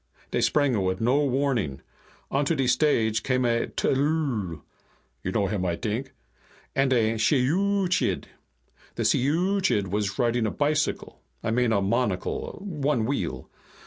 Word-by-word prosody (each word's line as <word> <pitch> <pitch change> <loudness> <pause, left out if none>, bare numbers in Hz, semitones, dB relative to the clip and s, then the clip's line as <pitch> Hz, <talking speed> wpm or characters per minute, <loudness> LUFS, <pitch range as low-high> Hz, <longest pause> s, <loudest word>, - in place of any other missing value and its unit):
"Dey - - 0
sprang 145 -3 +2
it 110 - +1
with 95 0 -1
no 130 +6 +2
warning. 130 - 0 0.5
Onto 145 +4 +1
de 135 -3 0
stage 125 -4 +2
came 130 -1 0
a 115 -1 +1
tllooll 135 - -1 0.6
(you 90 - -3
know 100 0 +1
him, 100 -1 -2
I 85 -2 0
t'ink), 115 +7 -4 0.6
and 135 0 +2
a 115 -3 +2
shiyooch'iid. 180 - +1 0.7
The - - -2
shiyooch'iid 165 - +1
was 105 +1 -1
riding 120 -1 +1
a - - 0
bicycle 150 +4 -1 0.2
I 110 - -1
mean 120 0 +2
a 100 -3 +2
monocle. 105 -2 -1
One 145 - 0
wheel. 65 - -3
125 Hz, 140 wpm, -26 LUFS, 105-145 Hz, 0.7 s, sprang